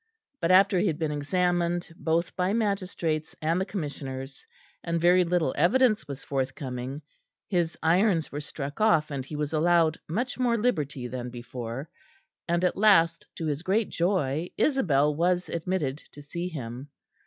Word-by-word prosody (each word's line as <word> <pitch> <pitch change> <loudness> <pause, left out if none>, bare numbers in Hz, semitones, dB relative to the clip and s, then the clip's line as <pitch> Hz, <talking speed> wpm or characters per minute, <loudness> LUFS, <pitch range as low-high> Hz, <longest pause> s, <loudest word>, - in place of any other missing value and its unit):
But 165 - 0
after 190 0 +5
he 205 - +2
had 160 -4 0
been 160 -2 -1
examined 175 +3 0
both 165 +1 -1
by 185 +2 +1
magistrates 185 -8 -1
and 165 +4 +1
the - - 0
Commissioners, 135 -7 -6 0.4
and 170 -1 -1
very 180 +2 +5
little 170 -5 +1
evidence 215 - +3
was 140 -1 -7
forthcoming, 135 0 -4 0.4
his 175 -4 0
irons 170 0 +3
were 145 - -4
struck 145 +3 -6
off 160 -8 +3
and 135 -2 -3
he 145 +4 -8
was 150 +1 -2
allowed 165 0 +3
much 245 +10 -2
more 240 -2 +2
liberty 150 - -1
than 125 0 -5
before; 120 +2 -6 0.6
and 170 +1 +1
at 180 - 0
last, 170 -6 +4
to 165 - -4
his 150 -1 -1
great 195 +5 +1
joy, 170 -3 0
Isabel 150 - +3
was 175 +3 +1
admitted 165 -5 -2 0.2
to 145 - -11
see 170 +5 -4
him. 130 -4 -7
165 Hz, 155 wpm, -27 LUFS, 145-180 Hz, 0.6 s, after